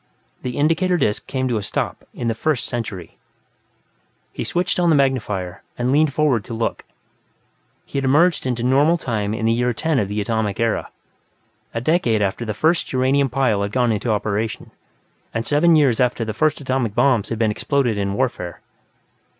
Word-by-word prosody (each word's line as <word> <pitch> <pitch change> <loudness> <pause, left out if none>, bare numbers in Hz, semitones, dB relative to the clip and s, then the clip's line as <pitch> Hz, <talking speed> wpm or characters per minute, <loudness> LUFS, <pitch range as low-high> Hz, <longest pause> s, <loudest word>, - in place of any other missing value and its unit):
The 125 -1 -4
indicator 165 +5 +2
disc 105 -9 -1
came 130 -1 -1
to 120 -3 0
a - - -2
stop, - - -3
in 120 - -4
the 115 - +1
First 140 +3 -1
Century. 105 -8 -6 1.1
He - - -4
switched 180 +1 -1
on 175 -1 +3
the 160 - +5
magnifier 105 -10 0 0.2
and 125 +1 0
leaned 150 +1 +3
forward 140 -7 +1
to 115 - -6
look; 115 0 -2 1.0
he 140 - -3
had 135 - -2
emerged 155 +3 +3
into 120 -2 -2
normal 140 +7 +4
time 110 -7 -2
in 110 - -2
the 115 - +3
year 120 +1 +1
10 160 -1 0
of 100 - 0
the 105 +2 -3
Atomic 105 -1 -1
Era, 115 -1 0 0.9
a 115 - -1
decade 120 -8 +2
after 100 +4 -2
the 110 -2 -3
first 160 +8 +1
uranium 135 +1 +2
pile 125 -5 +1
had 100 0 -2
gone 125 -2 +2
into 110 +2 -2
operation, 110 +1 -2 0.6
and 115 0 -1
seven 160 +3 +4
years 140 -7 +3
after 125 -2 +1
the 110 - -3
first 155 +7 +1
atomic 130 -6 -1
bombs 125 -7 +2
had 115 - -2
been 110 -1 +2
exploded 130 0 0
in 100 -1 -2
warfare. 95 -9 -2
120 Hz, 185 wpm, -21 LUFS, 110-140 Hz, 1.1 s, the